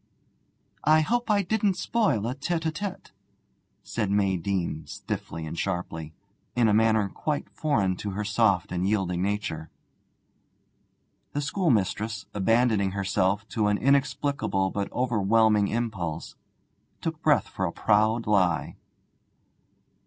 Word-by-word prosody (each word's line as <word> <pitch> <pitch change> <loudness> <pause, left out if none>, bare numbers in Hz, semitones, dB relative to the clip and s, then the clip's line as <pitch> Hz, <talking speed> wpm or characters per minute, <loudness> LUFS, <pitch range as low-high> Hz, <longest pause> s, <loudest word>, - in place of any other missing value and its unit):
'I 155 +1 +5
hope 240 +8 0
I 205 -1 +3
didn't 200 0 +1
spoil 205 - +1
a 120 - -1
tête 160 +5 -2
à - - 0
tête,' 195 +5 -6 0.7
said 105 -4 -2
May 100 -1 +2
Deane, 85 -4 -2
stiffly 80 -1 -5
and 80 +1 -5
sharply, 80 -2 -3 0.4
in 120 -2 +4
a 105 - +3
manner 110 -1 +3
quite 150 +8 -3
foreign 105 -12 0
to 105 - -4
her 100 +2 -3
soft 100 -2 +2
and 90 +2 0
yielding 95 -4 0
nature. 95 -6 -2 1.6
The 145 - -1
schoolmistress, 110 - 0
abandoning 105 -1 +2
herself 100 +1 0
to 110 -3 0
an 105 0 +2
inexplicable 135 -6 +1
but 100 -1 -3
overwhelming 110 -3 +3
impulse, 100 -9 -3 0.7
took - - -4
breath - - +3
for - - -3
a - - -3
proud 110 +2 +2
lie. 95 -5 +1
105 Hz, 125 wpm, -26 LUFS, 95-130 Hz, 1.6 s, I